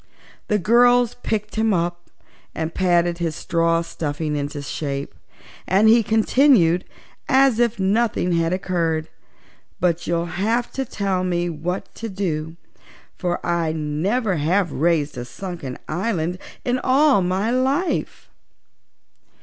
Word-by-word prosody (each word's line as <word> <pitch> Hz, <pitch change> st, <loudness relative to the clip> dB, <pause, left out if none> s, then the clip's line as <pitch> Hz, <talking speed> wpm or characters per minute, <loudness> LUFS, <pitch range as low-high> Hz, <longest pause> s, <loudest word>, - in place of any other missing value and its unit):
The 210 Hz, -, +2 dB
girls 240 Hz, +4 st, +4 dB
picked 215 Hz, 0 st, -3 dB
him 220 Hz, -2 st, +2 dB
up 175 Hz, 0 st, -3 dB, 0.5 s
and 160 Hz, 0 st, -3 dB
patted 175 Hz, -2 st, +1 dB
his 165 Hz, -3 st, -2 dB
straw 165 Hz, 0 st, +1 dB
stuffing 150 Hz, -2 st, -3 dB
into 145 Hz, 0 st, -4 dB
shape, 140 Hz, -1 st, -4 dB, 0.5 s
and 200 Hz, +4 st, +4 dB
he 230 Hz, +2 st, +6 dB
continued, 220 Hz, -, +3 dB, 0.4 s
as 265 Hz, -4 st, +4 dB
if 235 Hz, -3 st, +1 dB
nothing 200 Hz, -1 st, +1 dB
had 165 Hz, -1 st, +1 dB
occurred: 170 Hz, -4 st, -1 dB, 0.7 s
"But 175 Hz, -1 st, 0 dB
you'll 170 Hz, 0 st, 0 dB
have 215 Hz, +8 st, -1 dB
to 270 Hz, -, -3 dB
tell 195 Hz, -5 st, -1 dB
me 175 Hz, -1 st, -1 dB
what 170 Hz, +4 st, -4 dB
to 230 Hz, -, -6 dB
do, 165 Hz, -5 st, -3 dB, 0.6 s
for 175 Hz, -2 st, -2 dB
I 170 Hz, -2 st, 0 dB
never 175 Hz, +8 st, -1 dB
have 170 Hz, +4 st, +1 dB
raised 150 Hz, -3 st, 0 dB
a -, -, -4 dB
sunken 165 Hz, -2 st, -7 dB
island 180 Hz, -1 st, -2 dB, 0.3 s
in 250 Hz, +1 st, +1 dB
all 270 Hz, -3 st, +4 dB
my 190 Hz, +5 st, 0 dB
life." 265 Hz, +8 st, -1 dB
180 Hz, 125 wpm, -22 LUFS, 165-220 Hz, 0.7 s, he